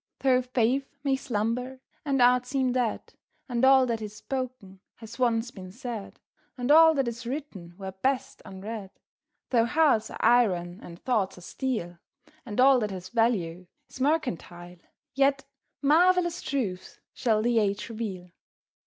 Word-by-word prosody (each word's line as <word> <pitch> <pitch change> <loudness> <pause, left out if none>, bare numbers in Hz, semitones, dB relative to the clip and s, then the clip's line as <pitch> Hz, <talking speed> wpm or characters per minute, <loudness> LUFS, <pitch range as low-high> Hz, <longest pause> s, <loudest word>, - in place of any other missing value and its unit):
Though 255 -2 +4
faith 255 +3 -1
may 275 -2 +2
slumber 250 +1 -2 0.2
and 275 -4 +2
art 250 0 +4
seem 265 -1 0
dead, 245 -3 -2 0.3
And 245 -1 -2
all 265 0 +6
that 230 -2 -2
is 210 -1 -7
spoken 250 -7 -6 0.2
has 225 +2 -12
once 240 -1 +1
been 185 -4 -10
said, 235 -2 -7 0.4
And 250 +2 0
all 320 +1 +8
that 270 -3 0
is 235 0 -5
written 230 - -6
were 190 -1 -6
best 255 +8 -2
unread; 195 +1 -7 0.6
Though 230 -3 +4
hearts 275 -7 +3
are - - -8
iron 185 -7 +2
and 170 -1 -10
thoughts 210 -8 0
are - - -12
steel, 175 -5 -4 0.5
And 210 +1 -5
all 265 0 +6
that 215 -2 -1
has 185 -1 -7
value 185 -7 0 0.2
is 260 - -9
mercantile, 180 - -2 0.4
Yet 275 0 +2 0.4
marvellous 345 +3 +3
truths 200 -10 -4
shall 220 -4 +1
the 240 -1 +3
age 200 -1 -1
reveal. 200 -6 -6
240 Hz, 150 wpm, -27 LUFS, 200-265 Hz, 0.6 s, all